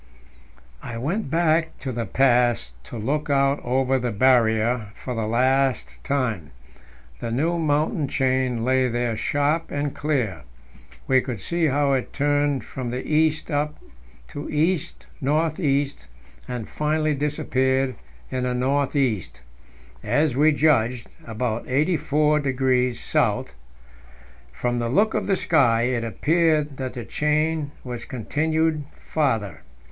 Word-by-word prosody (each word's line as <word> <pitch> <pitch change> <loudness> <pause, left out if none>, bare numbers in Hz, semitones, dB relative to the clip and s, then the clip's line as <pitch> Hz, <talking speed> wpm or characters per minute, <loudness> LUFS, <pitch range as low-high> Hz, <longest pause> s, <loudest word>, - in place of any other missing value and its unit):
I 115 -1 -6
went 170 - -2
back 165 0 +1
to 135 - -3
the 115 -2 -3
pass 120 - +2
to 120 - -8
look 145 +8 -2
out 140 0 +2
over 130 +1 +1
the 125 -1 -2
Barrier 115 -1 +3
for 125 - -6
the 115 -2 -2
last 130 +3 +1
time. 115 - -1 0.7
The 115 - -4
new 165 +8 0
mountain 150 -1 +1
chain 130 -3 0
lay 130 0 +3
there 120 -1 -1
sharp 145 +7 0
and 145 0 -2
clear; 125 - -1 0.6
we 130 -1 +4
could 125 -5 -5
see 170 - 0
how 140 0 +2
it 130 -2 -2
turned 145 -1 +1
from 130 -2 -5
the 125 +2 -4
east 155 +1 +1
up 150 +1 -1 0.5
to 145 - -6
east 150 - -1 0.2
north 155 +4 +1
east, 140 -3 0 0.4
and 120 -3 -5
finally 155 0 0
disappeared 135 -2 0 0.4
in 130 -1 -1
the 125 0 -1
north 135 +3 0
east 110 - -1 0.6
as 145 -3 +1
we 150 +3 +5
judged, 125 -6 +2 0.2
about 115 0 -3
84° 140 -4 +2 0.5
S. - - -19 1.0
From 120 - -2
the 120 0 -1
look 210 - +2
of - - -1
the 195 - +3
sky, 125 -11 +3
it 120 -1 0
appeared 150 +3 +1
that 130 -1 -4
the 120 -3 -6
chain 150 +3 0
was 125 -2 -6
continued 155 +5 0
farther. 115 - -1
135 Hz, 130 wpm, -23 LUFS, 120-150 Hz, 1.0 s, we